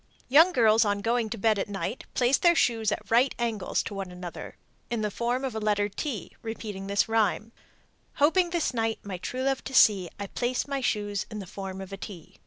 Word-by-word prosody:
Young 320 Hz, +7 st, +7 dB
girls 225 Hz, -6 st, +5 dB
on 205 Hz, -1 st, 0 dB
going 230 Hz, 0 st, 0 dB
to 230 Hz, -, -4 dB
bed 215 Hz, 0 st, +2 dB
at 200 Hz, -, -2 dB
night 205 Hz, +4 st, -4 dB
place 250 Hz, +2 st, +3 dB
their 345 Hz, -1 st, +5 dB
shoes 225 Hz, -7 st, +2 dB
at 210 Hz, 0 st, -5 dB
right 245 Hz, +4 st, +4 dB
angles 225 Hz, -5 st, -1 dB
to -, -, -6 dB
one 195 Hz, -2 st, -5 dB
another, 180 Hz, -1 st, -8 dB, 0.3 s
in 235 Hz, -2 st, -1 dB
the 210 Hz, -1 st, -1 dB
form 245 Hz, +5 st, -1 dB
of 260 Hz, -, -3 dB
the 220 Hz, -, -4 dB
letter 205 Hz, -1 st, +1 dB
T, 230 Hz, +1 st, -5 dB
repeating 210 Hz, -4 st, -6 dB
this 200 Hz, +2 st, +2 dB
rhyme: 225 Hz, 0 st, +1 dB, 0.6 s
Hoping 345 Hz, +5 st, +3 dB
this 335 Hz, -5 st, -1 dB
night 225 Hz, -2 st, 0 dB
my 190 Hz, -3 st, -6 dB
true 255 Hz, +7 st, -4 dB
love 270 Hz, -1 st, 0 dB
to 265 Hz, -, -5 dB
see, 195 Hz, -7 st, +5 dB
I 200 Hz, -, -3 dB
place 245 Hz, +7 st, -2 dB
my 275 Hz, -1 st, -2 dB
shoes 205 Hz, -4 st, -1 dB
in 215 Hz, -, -7 dB
the 200 Hz, -, -6 dB
form 190 Hz, +1 st, -7 dB
of 190 Hz, 0 st, -8 dB
a -, -, -5 dB
T. 185 Hz, -5 st, -10 dB
220 Hz, 215 wpm, -27 LUFS, 200-245 Hz, 0.6 s, Young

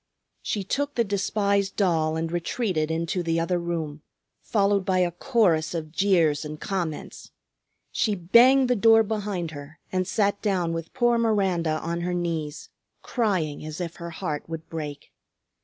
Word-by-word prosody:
She 205 Hz, -, -2 dB
took 285 Hz, +8 st, -2 dB
the 235 Hz, -, +3 dB
despised 200 Hz, -1 st, 0 dB
doll 160 Hz, -5 st, +1 dB
and 165 Hz, 0 st, -2 dB
retreated 175 Hz, -2 st, -1 dB
into 165 Hz, +3 st, -1 dB
the 165 Hz, -1 st, 0 dB
other 175 Hz, +2 st, 0 dB
room, 160 Hz, -3 st, -4 dB, 0.4 s
followed 200 Hz, -2 st, +1 dB
by 190 Hz, -1 st, +1 dB
a 180 Hz, -1 st, +2 dB
chorus 175 Hz, -, +1 dB
of 155 Hz, -2 st, -4 dB
jeers 170 Hz, -5 st, +2 dB
and 150 Hz, 0 st, -7 dB
comments. 175 Hz, -6 st, -4 dB, 0.6 s
She 215 Hz, -2 st, +1 dB
banged 245 Hz, +9 st, +5 dB
the 250 Hz, -, +2 dB
door 225 Hz, +1 st, +6 dB
behind 205 Hz, -6 st, -3 dB
her 145 Hz, +1 st, -10 dB
and 185 Hz, -1 st, 0 dB
sat 200 Hz, 0 st, +1 dB
down 180 Hz, -5 st, 0 dB
with 165 Hz, +4 st, -6 dB
poor 240 Hz, -2 st, +3 dB
Miranda 190 Hz, -8 st, +1 dB
on 170 Hz, +1 st, -2 dB
her 180 Hz, +1 st, -1 dB
knees, 160 Hz, -4 st, -3 dB, 0.3 s
crying 185 Hz, -, -1 dB
as 155 Hz, +1 st, -6 dB
if 170 Hz, -2 st, -5 dB
her 170 Hz, 0 st, -6 dB
heart 160 Hz, -3 st, -4 dB
would 165 Hz, -1 st, -6 dB
break. 150 Hz, -3 st, -6 dB
175 Hz, 155 wpm, -25 LUFS, 160-205 Hz, 0.6 s, door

